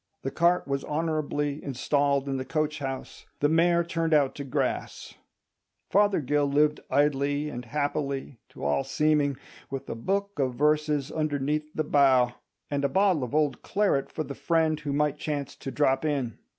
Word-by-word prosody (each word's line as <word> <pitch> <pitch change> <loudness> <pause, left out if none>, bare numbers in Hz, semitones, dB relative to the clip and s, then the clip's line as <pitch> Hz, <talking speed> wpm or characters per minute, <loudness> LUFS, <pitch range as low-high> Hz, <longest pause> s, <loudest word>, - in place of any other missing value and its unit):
The 135 - -2
cart 175 +2 +2
was 140 0 -1
honourably 150 -2 -2
installed 140 +1 0
in 135 -1 -1
the 130 - -3
coach 155 +1 -1
house, 135 -2 -6
the 145 - +3
mare 170 +2 +3
turned 165 -1 0
out 140 -3 +3
to 145 - -6
grass. 135 - -3 0.8
Fothergill 150 -8 +3
lived 150 +2 +2
idly 145 +1 +1
and 125 -3 -6
happily, 140 -1 -2
to - - -11
all 75 - +1
seeming, 145 0 +1 0.3
with 135 0 -5
"a - - -3
book 200 - -2
of 130 -3 0
verses 150 0 +1
underneath 150 0 -1
the 155 - 0
bough," 130 -4 +4 0.4
and 140 -1 -1
a 140 - +2
bottle 190 -3 +2
of 125 +3 -4
old 150 -3 +1
claret 195 -9 0
for 155 - -3
the 140 - -6
friend 160 0 +1
who 150 -1 -4
might 150 0 0
chance 145 -3 -3
to - - -6
drop 135 0 +1
in. 140 -7 -1
145 Hz, 165 wpm, -27 LUFS, 135-155 Hz, 0.8 s, bough